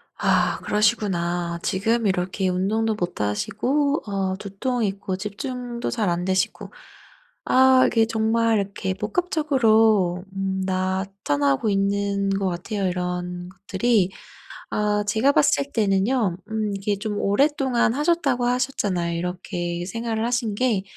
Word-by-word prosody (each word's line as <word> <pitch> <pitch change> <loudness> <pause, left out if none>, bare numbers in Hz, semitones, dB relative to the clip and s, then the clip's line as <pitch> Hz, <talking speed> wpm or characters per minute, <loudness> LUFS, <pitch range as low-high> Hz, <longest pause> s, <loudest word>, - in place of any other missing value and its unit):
아 - - +2
그러시구나. 175 -6 0
지금 220 +5 0
이렇게 185 0 0
운동도 215 +5 0
못 175 - -3
하시고 270 - 0
어 195 -2 -1
두통 225 +5 -3
있고 195 -1 -3
집중도 240 +4 -5
잘 215 -6 0
안되시고 180 +2 -1 0.7
아 260 0 +5
이게 225 -1 +3
정말 225 0 +2
이렇게 195 -1 -3
복합적으로 220 - +2
음 190 0 -2
나타나고 185 -4 0
있는 200 0 0
것 195 0 0
같아요 190 +3 -3
이런 180 0 -3
것들이. 195 +1 0 0.6
아 210 0 +1
제가 225 +7 +3
봤을 280 -1 +2
때는요 205 -1 +1
음 220 -1 -1
이게 200 +1 -1
좀 210 -1 -3
오랫동안 260 +2 +2
하셨다고 285 -4 +1
하셨잖아요 205 -9 0
이렇게 175 0 -4
생활을 225 +3 -2
하신 235 -3 -1
게. 220 -4 +1
205 Hz, 270 characters per minute, -23 LUFS, 185-230 Hz, 0.7 s, 아